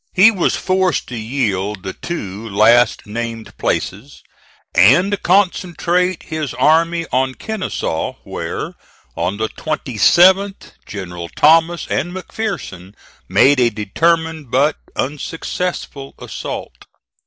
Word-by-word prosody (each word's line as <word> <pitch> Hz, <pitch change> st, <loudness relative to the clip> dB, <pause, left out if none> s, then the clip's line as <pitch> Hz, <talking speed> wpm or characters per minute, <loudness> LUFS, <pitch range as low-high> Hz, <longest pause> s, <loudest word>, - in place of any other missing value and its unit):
He 200 Hz, +5 st, +7 dB
was 185 Hz, -6 st, 0 dB
forced 185 Hz, -3 st, 0 dB
to 125 Hz, -, -5 dB
yield 105 Hz, -5 st, -2 dB
the 95 Hz, -, -5 dB
two 110 Hz, -, -6 dB
last 115 Hz, +4 st, +4 dB
named 115 Hz, +1 st, -5 dB
places, 110 Hz, +10 st, -3 dB, 0.5 s
and 180 Hz, -, +4 dB
concentrate 180 Hz, -1 st, +1 dB
his 155 Hz, -6 st, -4 dB
army 165 Hz, +5 st, +3 dB
on 130 Hz, 0 st, 0 dB
Kenesaw, 190 Hz, -, -3 dB
where, -, -, -5 dB, 0.4 s
on 90 Hz, +4 st, -2 dB
the 110 Hz, +1 st, -1 dB
27th, 175 Hz, -, +2 dB, 0.2 s
Generals 90 Hz, -4 st, -7 dB
Thomas 165 Hz, +2 st, +4 dB
and 175 Hz, -, -1 dB
McPherson 180 Hz, -, -5 dB, 0.3 s
made 140 Hz, 0 st, +5 dB
a 120 Hz, -1 st, +4 dB
determined 160 Hz, -, 0 dB
but 140 Hz, +5 st, +2 dB, 0.2 s
unsuccessful 150 Hz, 0 st, -4 dB
assault. -, -, -7 dB
140 Hz, 105 wpm, -18 LUFS, 110-175 Hz, 0.5 s, He